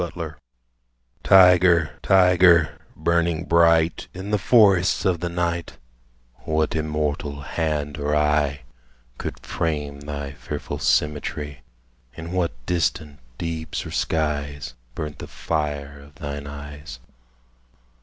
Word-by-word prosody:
THE 85 - -1
TYGER 85 -2 -6 0.9
Tyger, 90 -3 +5
tyger, 90 -3 +5 0.3
burning 85 0 +1
bright 85 0 +3
In 95 +3 -6
the 105 - +2
forests 95 -1 +4
of 90 -3 +2
the 85 +1 -2
night, 85 -1 -2 0.6
What 80 +1 -1
immortal 75 -2 -2
hand 75 -1 -2
or 75 +1 0
eye 75 -2 +1 0.6
Could - - -5
frame 75 -3 -2
thy 70 -1 -5
fearful 75 - -6
symmetry? 75 -1 -1 0.5
In 80 +1 -7
what 85 -10 -2
distant 80 -4 -1 0.2
deeps 80 -1 -4
or - - -7
skies 70 -5 -2 0.2
Burnt 75 -3 -5
the - - -7
fire 75 -3 -3
of 70 0 -16
thine 70 -2 -6
eyes? 75 -1 -9
80 Hz, 115 wpm, -23 LUFS, 75-85 Hz, 0.9 s, Tyger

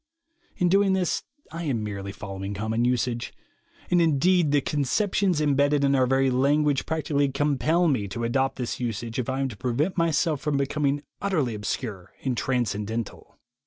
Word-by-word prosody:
In 180 - +2
doing 195 +2 +4
this, 185 -2 0 0.3
I 165 +1 -5
am 120 -7 -1
merely 100 -2 -5
following 100 0 -6
common 110 +3 -1
usage; 125 -1 -1 0.6
and, 175 -1 +4
indeed, 165 +2 +3
the 145 0 +4
conceptions 180 - +1
imbedded 145 -1 +2
in 140 0 +3
our 130 -2 +3
very 135 0 +2
language 140 +2 +2
practically 145 -3 0
compel 150 +5 +1
me 125 -10 +1
to 115 +4 -5
adopt 135 +3 +1
this 125 -3 -4
usage 115 0 -3
if 125 - -2
I 130 +1 -1
am 135 - 0
to 110 - -9
prevent 135 - -1
myself 160 -2 +1
from 150 -2 0
becom 140 +1 0
ing 145 +1 0 0.2
utterly 155 - 0
obscure 105 -2 -5
and 130 -2 0
transcendental. 115 -3 -3
135 Hz, 165 wpm, -25 LUFS, 115-150 Hz, 0.6 s, doing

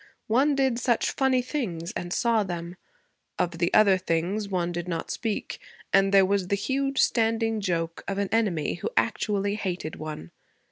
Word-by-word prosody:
One 270 +6 +3
did 265 -3 +1
such 240 -2 +1
funny 260 -2 +2
things, 190 - -3
and 175 - -5
saw 230 +2 +2
them; 175 -2 -5 0.6
of 170 -1 -1
the 170 0 +1
other 195 -3 +5
things 185 +4 -1
one 175 -2 -1
did 175 0 -4
not 165 -2 -3
speak; 225 -3 -3 0.3
and 195 0 +4
there 195 -1 +6
was 195 -1 0
the 200 - +1
huge 270 +6 -1
standing 225 -1 +2
joke 165 -3 -2
of 195 - -2
an 200 -1 -1
enemy 180 -8 0
who - - -1
actually 200 -1 +1
hated 180 -6 -4
one. 150 - -7
195 Hz, 170 wpm, -26 LUFS, 175-225 Hz, 0.6 s, there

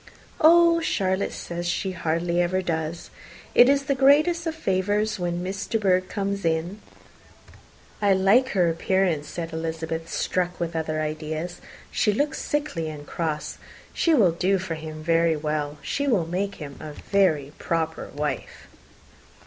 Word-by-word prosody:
"Oh, 335 +1 +6
Charlotte 195 - 0
says 175 0 -4
she 190 +2 -1
hardly 170 0 0
ever 185 +2 0
does. 160 -1 -3 0.4
It 245 - +7
is 280 0 +3
the 275 0 0
greatest 305 +6 +4
of 320 - -2
favours 205 - 0
when 175 0 -2
Miss 195 +2 -4
De 225 - +1
Bourgh 185 -3 +1
comes 200 -1 -2
in." 165 +5 -1 1.2
"I 200 -1 +4
like 200 +8 +4
her 180 -4 +3
appearance," 165 -2 0
said 165 -1 -6
Elizabeth, 160 0 -4
struck 180 -1 -1
with 170 -1 -3
other 155 -1 -1
ideas. 155 +2 -4 0.3
"She 210 - +2
looks 290 +7 -1
sickly 290 - -2
and 150 -1 -8
cross. 155 -1 -3
Yes, - - -19 0.3
she 335 - +2
will 200 - +5
do 185 +4 +1
for 175 -2 -4
him 155 -1 -7
very 165 0 +3
well. 150 -1 -2
She 285 0 -2
will 210 -11 +2
make 195 +4 -2
him 145 -3 -9
a 150 - -8
very 155 -7 +1
proper 160 -1 -2
wife." 145 -2 -4
175 Hz, 155 wpm, -25 LUFS, 160-200 Hz, 1.2 s, It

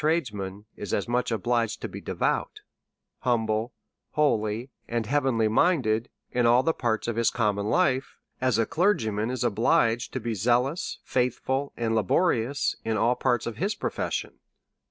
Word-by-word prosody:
109 155 +2 +3 0.2
tradesman 100 0 -6
is 105 - -3
as 100 - -2
much 125 +1 0
obliged 115 +1 0
to - - -4
be - - -8
devout, - - -1 0.6
humble, 115 -1 0 0.4
holy, 115 -4 +1 0.2
and 115 -1 -1
heavenly 130 -3 +2
minded, 115 -3 +2 0.2
in 120 -1 +2
all 120 +2 +5
the 165 - +2
parts 115 -5 -1
of 115 - -1
his 115 - +3
common 105 -3 0
life, 135 -2 +1 0.2
as 130 -3 +2
a 115 - +2
clergyman 120 - +1
is 130 -1 -2
obliged 115 +1 +2
to 130 - -3
be 115 -1 -3
zealous, 125 - 0
faithful, 130 +2 -1
and 115 -1 0
laborious 125 - +1
in 110 -1 0
all 115 +3 +3
parts 125 -2 0
of 115 -2 -5
his 200 +5 -1
profession. - - -3
120 Hz, 155 wpm, -26 LUFS, 110-130 Hz, 0.6 s, all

